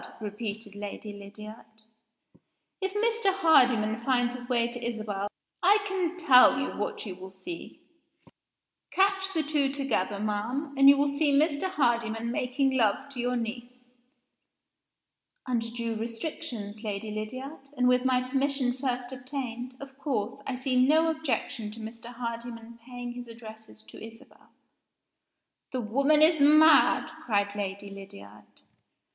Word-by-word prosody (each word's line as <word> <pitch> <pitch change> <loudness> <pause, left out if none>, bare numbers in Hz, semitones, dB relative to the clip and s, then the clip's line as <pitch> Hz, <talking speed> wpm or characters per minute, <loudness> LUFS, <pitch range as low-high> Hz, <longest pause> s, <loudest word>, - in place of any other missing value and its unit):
_" - - -11
repeated 210 -1 -6
Lady 205 +1 -7
Lydiard. 210 +2 -10 1.2
"If 385 0 -1
Mr. 450 -1 +2
Hardyman 250 - +3
finds 245 -1 +2
his 245 0 -9
way 235 -2 +2
to 240 0 -7
Isabel 215 -4 -3 0.3
I 395 +4 +6
can 365 -3 -1
tell 260 -6 +6
you 270 - -2
what 210 - -4
you 195 - -5
will 185 +1 -10
see. 335 - -9 1.1
Catch 390 0 +2
the 320 - +2
two 290 -2 +1
together, 245 -8 -1
ma'am 225 +8 -2
and 275 0 +7
you 280 - +7
will 285 +1 +3
see 285 +1 +1
Mr. 295 +5 +2
Hardyman 235 -7 0
making 255 +2 0
love 240 +1 +1
to 270 -3 -9
your 245 +1 0
niece." 245 +1 -6 1.5
"Under 235 -3 -1
due 230 -1 -3
restrictions, 230 -2 -5
Lady 210 0 -4
Lydiard, 260 +7 -6
and 250 0 +3
with 250 0 +4
my 255 -1 +1
permission 270 -1 0
first 250 -1 -3
obtained, 255 -1 -5
of 275 -1 -11
course, 245 -7 -2
I 265 - -2
see 255 -1 +2
no 320 +4 +4
objection 255 -8 -3
to 230 - -11
Mr. 225 +1 -8
Hardyman 235 -1 -7
paying 245 -1 -6
his 245 0 -8
addresses 220 -1 -12
to - - -12
Isabel." 225 +4 -14 1.2
"The 255 - -2
woman 275 +7 +3
is 315 -1 +5
mad!" 310 +2 +6
cried 200 -2 0
Lady 200 0 -4
Lydiard. 105 - -13
245 Hz, 140 wpm, -28 LUFS, 220-280 Hz, 1.5 s, and